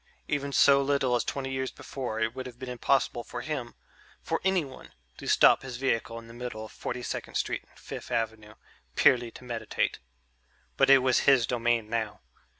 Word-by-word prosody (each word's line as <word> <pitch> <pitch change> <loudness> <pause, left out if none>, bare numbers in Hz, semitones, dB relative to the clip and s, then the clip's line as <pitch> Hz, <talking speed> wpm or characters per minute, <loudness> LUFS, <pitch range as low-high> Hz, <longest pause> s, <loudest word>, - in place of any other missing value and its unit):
Even 140 -1 -1
so 140 0 +6
little 135 -3 +2
as 120 - +1
twenty 135 -1 -3
years 130 0 -2
before, 125 -5 -5
it 115 +1 0
would 130 0 -6
have 120 -1 -11
been 130 0 -7
impossible 125 -1 +1
for 120 - -6
him 130 -5 -4 0.5
for - - -1
anyone 180 -8 -1 0.2
to - - -8
stop - - +6
his 130 -3 -6
vehicle 115 -3 -1
in 115 - -9
the 115 - -12
middle 120 -2 -6
of - - -12
Forty 125 0 -5
second - - -5
Street - - -1
and - - -24
Fifth - - -8
Avenue 110 -1 -2 0.4
purely 120 -2 +4
to 120 - -13
meditate. 115 -3 -2 0.8
But - - +4
it 135 -2 +7
was 130 -1 +4
his 130 -4 +5
domain 120 -2 +1
now. 110 -1 -3
125 Hz, 185 wpm, -28 LUFS, 115-135 Hz, 0.8 s, it